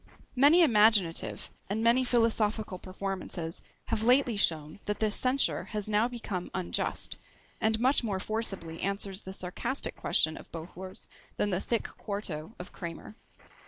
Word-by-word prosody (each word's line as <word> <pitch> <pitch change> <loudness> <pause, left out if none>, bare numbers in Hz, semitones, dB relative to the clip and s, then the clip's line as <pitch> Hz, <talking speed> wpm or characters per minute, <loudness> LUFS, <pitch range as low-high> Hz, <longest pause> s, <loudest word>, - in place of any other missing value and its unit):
Many 295 +7 +6
imaginative 210 - +3 0.2
and 215 +3 -1
many 235 +3 +4
philosophical 220 -5 +1
performances 185 -3 -5 0.3
have 225 -2 0
lately 250 0 +4
shown 160 -4 +1
that 210 0 -1
this 215 -1 +2
censure 260 +2 +1
has 210 -2 -3
now 215 +2 +2
become 220 -7 -5
unjust; 185 -2 -2 0.4
and 220 0 +2
much 260 +2 +3
more 200 -4 -2
forcibly 195 -6 -2
answers 200 0 -1
the 190 - -7
sarcastic 190 +8 -1
question 155 0 +1
of - - -13
Bohours 180 +3 -8 0.3
than 205 - +1
the 185 +1 0
thick 235 - 0 0.2
quarto 200 -3 -4
of 180 - -9
Kramer. 170 +4 -8
210 Hz, 140 wpm, -29 LUFS, 185-230 Hz, 0.4 s, Many